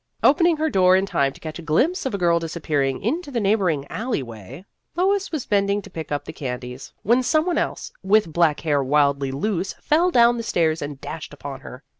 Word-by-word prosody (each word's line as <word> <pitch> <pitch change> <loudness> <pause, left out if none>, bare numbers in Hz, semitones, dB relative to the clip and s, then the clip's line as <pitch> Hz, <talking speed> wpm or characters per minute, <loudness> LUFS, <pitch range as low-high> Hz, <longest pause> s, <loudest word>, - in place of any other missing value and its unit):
Opening 335 +2 +4
her 315 +1 0
door 185 -1 +5
in 190 +1 +2
time 140 -8 +1
to - - -16
catch 155 +1 -7
a - - -7
glimpse 265 - +1
of 250 - -3
a - - -1
girl 170 -2 +2
disappearing 155 -3 -2
into 295 - -2
the 250 -4 -2
neighboring 195 -9 +1
alley 225 - -3
way, 120 - -11 0.3
Lois 390 +2 +1
was 310 -6 -3
bending 200 0 +1
to - - -13
pick 160 -2 -7
up 145 -1 -2
the - - -8
candies, 125 -1 -6
when 240 +5 +3
some 310 +5 +2
one 360 - +1
else - - -3
with 195 -3 +2
black 165 -3 +2
hair 145 -3 +1
wildly 140 0 +2
loose 185 +6 -2
flew 340 +4 +1
down 240 -3 +5
the - - -2
stairs, 165 -7 0
and 145 -1 -6
dashed 145 +1 -7
up - - -27
to 140 -2 -6
her. 130 +4 -10
170 Hz, 220 wpm, -22 LUFS, 145-235 Hz, 0.3 s, door